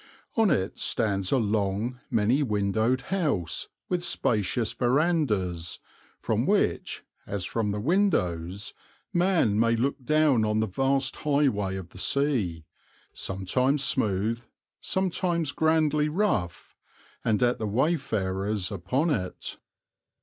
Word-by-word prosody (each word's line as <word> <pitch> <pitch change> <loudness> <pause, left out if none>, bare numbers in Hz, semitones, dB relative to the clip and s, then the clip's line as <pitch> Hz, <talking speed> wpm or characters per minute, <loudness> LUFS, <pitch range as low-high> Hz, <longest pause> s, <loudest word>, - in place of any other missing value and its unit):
On 225 -3 +4
it 95 - 0
stands 100 -4 0
a 135 - +4
long, 110 +2 -1
many 115 +6 +2
windowed 110 +1 +1
house 140 - -1 0.2
with 180 -1 -1
spacious 115 - +1
verandas, 120 - 0 0.4
from - - 0
which, - - 0 0.2
as 100 -3 -2
from 110 +1 -1
the 105 +1 -2
windows, 100 - 0 0.4
man 175 - +2
may 115 0 +3
look 130 +3 -1
down 150 -4 +3
on 105 0 +1
the 110 - +2
vast 135 +6 0
highway 135 -10 +1
of 95 -2 -7
the 95 - -13
sea, 110 - 0 0.5
sometimes 125 +9 0
smooth, 115 -4 0 0.4
sometimes 175 -4 0
grandly 155 -1 +2
rough, 150 - -1 0.5
and 110 +1 +2
at 120 +1 +2
the 110 - -2
wayfarers 105 - 0
upon 115 - 0
it. 95 -10 -3
115 Hz, 115 wpm, -27 LUFS, 100-150 Hz, 0.5 s, On